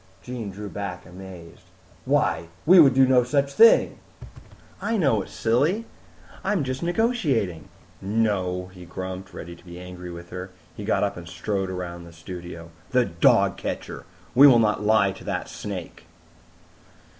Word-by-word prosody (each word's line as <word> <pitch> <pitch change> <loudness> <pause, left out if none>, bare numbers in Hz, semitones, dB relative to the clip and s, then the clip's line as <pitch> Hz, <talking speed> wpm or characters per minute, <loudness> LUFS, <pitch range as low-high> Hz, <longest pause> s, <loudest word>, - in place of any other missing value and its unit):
'" 95 - -30
Jean 125 -4 -5
drew 105 +2 -7
back 100 -3 -6
amazed. 90 -2 -11 0.4
"Why, 85 - +1 0.2
we 180 +3 +8
would 135 -6 +7
do 135 0 +6
no 130 -1 +4
such 140 +2 0
thing!" 230 +10 +5 0.8
"I 225 - 0
know 135 - +2
it, - - -9
silly. 150 - +1 0.6
I'm 200 -7 0
just 130 0 -4
negotiating." 170 - 0 0.3
"No," 95 -3 -1
he 90 -1 -12
grumped, 95 +1 -7
ready 85 +1 -8
to 85 - -20
be 85 0 -10
angry 90 0 -9
with 85 0 -10
her. 90 +1 -6 0.3
He - - -7
got - - +1
up - - -1
and 85 -1 -9
strode 95 +3 -3
around 85 -2 -6
the 85 - -13
studio. 85 0 -9 0.2
"The 125 -1 +3
dog 85 -4 +3
catcher! - - -5 0.3
We 140 +3 +9
will 130 -4 +7
not 105 -2 +2
lie 105 -2 +3
to 95 - -11
that - - -3
snake!" 95 -4 -7
95 Hz, 160 wpm, -24 LUFS, 90-130 Hz, 0.8 s, We